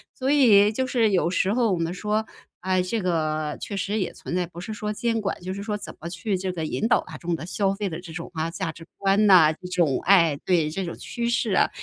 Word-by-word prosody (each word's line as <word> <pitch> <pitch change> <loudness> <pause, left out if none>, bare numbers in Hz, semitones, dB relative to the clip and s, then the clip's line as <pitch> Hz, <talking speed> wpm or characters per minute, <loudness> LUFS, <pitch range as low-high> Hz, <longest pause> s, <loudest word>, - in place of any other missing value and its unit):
所 260 +1 -2
以 215 -8 +6
就 260 +4 0
是 235 -4 +2
有 180 -3 +2
时 190 +2 +1
候 235 -2 +2
我 - - 0
们 165 +1 -1
说， 210 +3 -1 0.4
哎， 185 0 +1
这 185 +5 -2
个 155 -4 -1
确 200 - -5
实 205 +3 -1
也 190 - -2
存 - - -6
在， 180 -1 0
不 170 0 -11
是 215 +5 -6
说 210 0 -3
监 230 +1 -1
管， 195 - -3
就 185 +1 -4
是 200 - -6
说 210 0 -2
怎 - - -9
么 170 - -6
去 185 +4 -2
这 185 0 -3
个 165 -3 -4
引 215 - -1
导 235 - +3
大 - - -10
众 175 -1 -2
的 160 - -7
消 195 +2 0
费 200 -1 -2
的 165 0 -6
这 175 -2 -10
种 165 +2 -7
啊， 160 0 -2
价 185 -1 -3
值 165 +2 -13
观 200 +2 +3
哪， 170 -5 +7
这 180 +3 -10
种， 170 -7 +1
哎， 165 -7 +4
对， 170 -4 +2
这 190 +5 -3
种 170 - -5
趋 235 0 -3
势 235 -2 0
啊， - - +3
185 Hz, 280 characters per minute, -24 LUFS, 170-210 Hz, 0.4 s, 哪